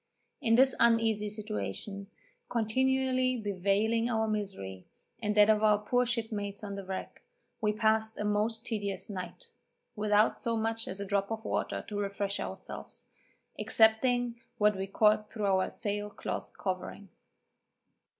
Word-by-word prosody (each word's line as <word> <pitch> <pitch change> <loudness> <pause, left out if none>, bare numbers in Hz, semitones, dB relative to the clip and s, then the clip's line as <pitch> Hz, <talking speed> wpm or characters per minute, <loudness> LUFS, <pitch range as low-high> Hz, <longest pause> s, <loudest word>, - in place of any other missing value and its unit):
In 230 -4 +4
this 265 +2 +5
uneasy 225 -3 +3
situation, 195 - -5 0.4
continually 255 +2 +1
bewailing 210 +3 +1
our 220 -2 +1
misery, 190 - -4 0.3
and 210 -1 0
that 210 0 +8
of 215 -1 +4
our 210 -1 +5
poor 245 +4 +1
shipmates 215 -4 -3
on 200 -1 -5
the 200 0 -5
wreck, 190 0 -6 0.4
we 210 -1 +2
passed 220 0 +1
a 210 - -1
most 215 +2 0
tedious 205 -2 -3
night, 200 - -7 0.4
without 210 0 +2
so 230 -1 0
much 225 +1 -1
as 190 - -5
a 200 - -3
drop 200 0 0
of 225 0 -4
water - - -2
to 205 -1 -3
refresh 200 0 -1
ourselves, - - -7 0.5
excepting 235 +2 +3 0.2
what 210 -1 +4
we 190 0 -3
caught 210 +1 +3
through 215 -2 -3
our 190 -1 +2
sail 205 -1 -3
cloth 205 - -5
covering. 190 +1 -4
210 Hz, 140 wpm, -31 LUFS, 200-225 Hz, 0.5 s, that